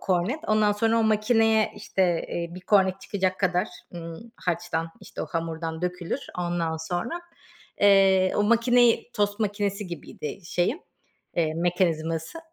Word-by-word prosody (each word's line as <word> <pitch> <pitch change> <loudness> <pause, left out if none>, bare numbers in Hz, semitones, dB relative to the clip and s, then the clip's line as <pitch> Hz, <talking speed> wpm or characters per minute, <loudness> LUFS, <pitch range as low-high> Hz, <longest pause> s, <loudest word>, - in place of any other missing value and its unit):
kornet. 190 - 0
Ondan 215 -1 +3
sonra 225 +2 +2
o - - +3
makineye, 220 0 +3
işte, 190 - -1 0.3
eee, 170 0 -4
bir 185 - -8
kornet 190 -1 +3
çıkacak 185 -2 -1
kadar, 180 -1 +1 0.3
ımm, 170 +7 -8
harçtan, 170 -1 -2
işte, 200 - -7
o - - -4
hamurdan 165 0 -4
dökülür. 180 -1 -2 0.2
Ondan 175 -2 -1
sonra, 175 - -3 0.6
eee, 195 -2 +5
o 205 - +3
makineyi 235 +2 +4
Tost 205 +1 0
makinesi 205 -1 -1
gibiydi, 165 -2 -7
şeyim, 180 - 0 0.6
eee, 160 -2 +1
mekanizması. 165 - 0
185 Hz, 135 wpm, -26 LUFS, 170-210 Hz, 0.6 s, eee